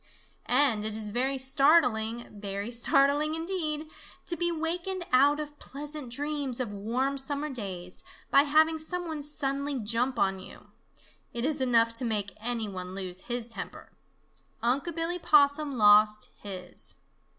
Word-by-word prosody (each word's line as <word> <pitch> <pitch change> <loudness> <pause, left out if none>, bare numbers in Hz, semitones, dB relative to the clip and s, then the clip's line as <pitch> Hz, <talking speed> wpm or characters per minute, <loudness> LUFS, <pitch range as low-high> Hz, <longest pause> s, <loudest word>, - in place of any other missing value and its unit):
And 245 -5 +4
it 215 0 -2
is 210 -1 -2
very 265 +4 0
startling, 260 -4 +3
very 200 +1 -5
startling, 285 +5 +2
indeed, 325 -3 -2 0.4
to 345 - -1
be 345 0 +1
wakened 345 +3 -3
out 285 +3 +5
of 295 -1 -7
pleasant 290 -1 -6
dreams 280 -1 -3
of 245 -5 -2
warm 250 +7 -1
summer 285 +2 -2
days 185 -7 -6 0.3
by 275 - +7
having 315 +2 +3
some 355 +3 -4
one 315 -2 -4
suddenly 280 -1 -2
jump 235 +3 -1
on 195 -2 +1
you. 185 - -13 0.6
It 235 +1 -1
is 295 -2 0
enough 230 -3 +3
to 230 - -2
make 205 -4 -1
any 225 0 -2
one 185 -1 -6
lose 185 -1 -6
his 240 -1 -2
temper. 230 - -8 0.7
Unc' 275 +7 0
Billy 335 +2 -1
Possum 290 -2 +4
lost 210 0 +5
his. 180 - -8
265 Hz, 145 wpm, -28 LUFS, 220-300 Hz, 0.7 s, by